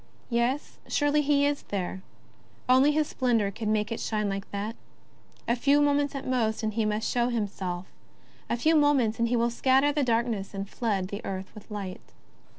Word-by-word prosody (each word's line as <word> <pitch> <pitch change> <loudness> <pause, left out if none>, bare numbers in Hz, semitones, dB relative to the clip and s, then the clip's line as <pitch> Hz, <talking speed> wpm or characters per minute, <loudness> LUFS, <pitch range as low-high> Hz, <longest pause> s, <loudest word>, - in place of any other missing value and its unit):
Yes, 240 +5 0
surely 290 0 +2
he 285 -1 +3
is 285 0 0
there; 190 -1 -4 0.7
only 260 +3 +5
his 305 +1 +2
splendour 230 -6 +1
could 220 +2 -5
make 215 0 0
it 230 - -2
shine 210 -2 -1
like 195 0 -4
that. 205 +3 -4 0.7
A 235 - +3
few 280 +4 +3
moments 290 -1 +2
at 275 - -5
most 230 -4 0
and 215 0 -1
he 220 0 0
must 215 +1 -1
show 240 0 +1
himself; 190 -6 -3 0.6
a 235 - 0
few 315 +7 +3
moments 280 -8 +3
and 235 - +2
he 245 - +1
will 235 0 +2
scatter 265 +4 +3
the 290 0 0
darkness 230 -5 0
and 195 0 -4
flood 200 -5 -2
the 205 +2 -6
earth 190 0 -5
with 215 0 -13
light. 200 -3 -7
235 Hz, 185 wpm, -27 LUFS, 210-275 Hz, 0.7 s, only